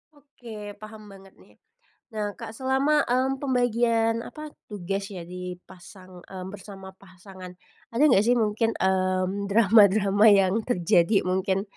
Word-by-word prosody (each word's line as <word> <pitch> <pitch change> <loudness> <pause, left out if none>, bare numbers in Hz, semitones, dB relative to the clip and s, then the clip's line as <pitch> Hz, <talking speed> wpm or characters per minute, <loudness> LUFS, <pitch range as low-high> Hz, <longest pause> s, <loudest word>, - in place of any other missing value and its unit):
Oke, 230 -7 -11
paham 215 0 -11
banget 195 -1 -16
nih. - - -22 0.6
Nah, 210 -2 -4
Kak, - - -9
selama, 265 +5 0
mmm, 260 +2 0
pembagian 235 -3 0
apa, 305 +5 -9 0.2
tugas 195 -1 -5
ya, 185 -4 -8
di 180 +1 -7
pasang, 185 0 -15
mmm, 185 -1 -8
bersama 195 -1 -11
pasangan. 185 -1 -13 0.3
Ada 235 +6 0
nggak 200 -4 +4
sih 245 - +4
mungkin, 220 0 0
mmm, 185 +1 -1
drama-drama 205 -1 +4
yang 195 -2 +4
terjadi 180 -1 +2
mungkin? 190 +1 -1
205 Hz, 135 wpm, -25 LUFS, 190-230 Hz, 0.6 s, nggak